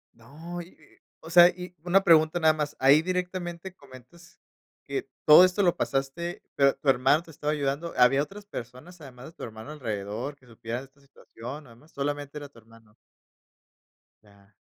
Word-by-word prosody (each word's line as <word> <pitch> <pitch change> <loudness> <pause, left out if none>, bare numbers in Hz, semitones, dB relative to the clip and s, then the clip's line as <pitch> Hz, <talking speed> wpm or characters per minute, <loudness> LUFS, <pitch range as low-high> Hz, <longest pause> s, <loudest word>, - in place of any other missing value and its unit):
No, 160 +9 -9
y 170 - -11
y, - - -25 0.4
o 160 - -12
sea, 175 +1 +8
y 180 0 -9
una 185 +2 +3
pregunta 160 +1 +4
nada 160 -1 +4
más, 150 -1 -4
ahí 140 +4 +6
directamente 180 0 -4
comentas 140 +5 -17 0.5
que 395 - -4 0.2
todo 155 +4 +9
esto 185 +2 +2
lo 175 -3 +3
pasaste, 140 +6 -3
pero 140 -1 +4
tu 145 - -11
hermano 135 +4 +4
te 165 - -15
estaba 150 0 -3
ayudando, 145 +3 -2
¿había 125 +3 +4
otras 200 +6 -11
personas 140 - -10
además 125 -2 -12
de 160 - -11
tu - - -11
hermano 110 +5 -9
alrededor, 115 +1 -5
que 130 - -25
supieran 120 +2 -6
de - - -12
esta 140 +1 -27
situación, 135 +1 -11
además 120 +7 -19
solamente 145 +1 -4
era 145 - -7
tu 135 -5 -19
hermano? 115 -1 -21 1.3
Ya. 100 0 -23
145 Hz, 175 wpm, -26 LUFS, 125-170 Hz, 1.3 s, todo